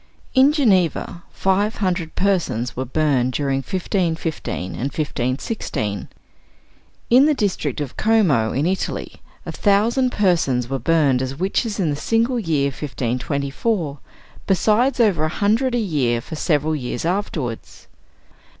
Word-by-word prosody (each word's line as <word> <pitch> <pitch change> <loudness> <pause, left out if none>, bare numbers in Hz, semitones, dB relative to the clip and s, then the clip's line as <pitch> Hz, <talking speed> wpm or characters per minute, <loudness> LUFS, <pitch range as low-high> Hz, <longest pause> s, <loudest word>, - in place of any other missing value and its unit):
In 265 +2 +6
Geneva, 190 - +1
five 200 +3 +1
hundred 180 -5 -2
persons 170 - 0
were 130 - -3
burned 130 -2 +1
during 135 -1 0
1515 165 - -2
and - - -7
1516. 130 - -3 1.0
In 255 +4 +7
the 305 - +3
district 180 - -1
of 145 -4 -5
Como 180 - +3
in 140 +4 0
Italy, 185 +2 -3 0.2
a - - -4
thousand 230 +6 +2
persons 165 - +1
were 135 +1 -2
burned 140 -2 +2
as 130 +1 -3
witches 200 - -1
in 165 -6 +1
the - - -1
single 230 - +1
year 155 -8 +1
1524, 140 - -2 0.5
besides 220 +8 +2
over 190 -9 +3
a - - 0
hundred 225 +8 +1
a - - +2
year 145 - 0
for 135 - -8
several 155 -1 +1
years 125 0 -4
afterwards. 165 - -3
165 Hz, 130 wpm, -21 LUFS, 135-205 Hz, 1.0 s, In